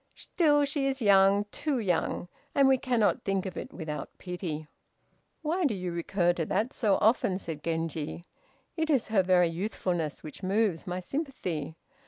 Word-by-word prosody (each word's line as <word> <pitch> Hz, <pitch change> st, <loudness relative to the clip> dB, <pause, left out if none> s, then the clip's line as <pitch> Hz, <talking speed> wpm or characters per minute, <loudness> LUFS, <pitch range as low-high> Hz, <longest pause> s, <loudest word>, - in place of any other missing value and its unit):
Still 290 Hz, -4 st, +2 dB
she 280 Hz, -1 st, -1 dB
is 270 Hz, 0 st, -1 dB
young, 200 Hz, -2 st, +5 dB
too 290 Hz, -3 st, -1 dB
young, 180 Hz, -4 st, 0 dB, 0.3 s
and 275 Hz, -1 st, +6 dB
we 265 Hz, -1 st, +4 dB
cannot 240 Hz, -5 st, +1 dB
think 195 Hz, -1 st, 0 dB
of 190 Hz, -, -5 dB
it -, -, -6 dB
without 155 Hz, -3 st, -5 dB
pity." 175 Hz, -4 st, -5 dB, 0.8 s
"Why 340 Hz, +4 st, 0 dB
do 265 Hz, -9 st, +2 dB
you 180 Hz, -2 st, -3 dB
recur 175 Hz, +1 st, +1 dB
to 170 Hz, -2 st, -2 dB
that 225 Hz, +7 st, 0 dB
so 210 Hz, -5 st, +2 dB
often?" 215 Hz, -4 st, +3 dB
said 160 Hz, -6 st, -7 dB
Genji, 165 Hz, 0 st, -3 dB, 0.5 s
"it 320 Hz, -1 st, -1 dB
is 270 Hz, -8 st, +2 dB
her 215 Hz, -3 st, +4 dB
very 180 Hz, -2 st, +4 dB
youthfulness 175 Hz, -3 st, -2 dB
which 155 Hz, +3 st, -9 dB
moves 195 Hz, -3 st, 0 dB
my 180 Hz, +1 st, -3 dB
sympathy. 180 Hz, -, -4 dB
195 Hz, 165 wpm, -29 LUFS, 170-255 Hz, 0.8 s, and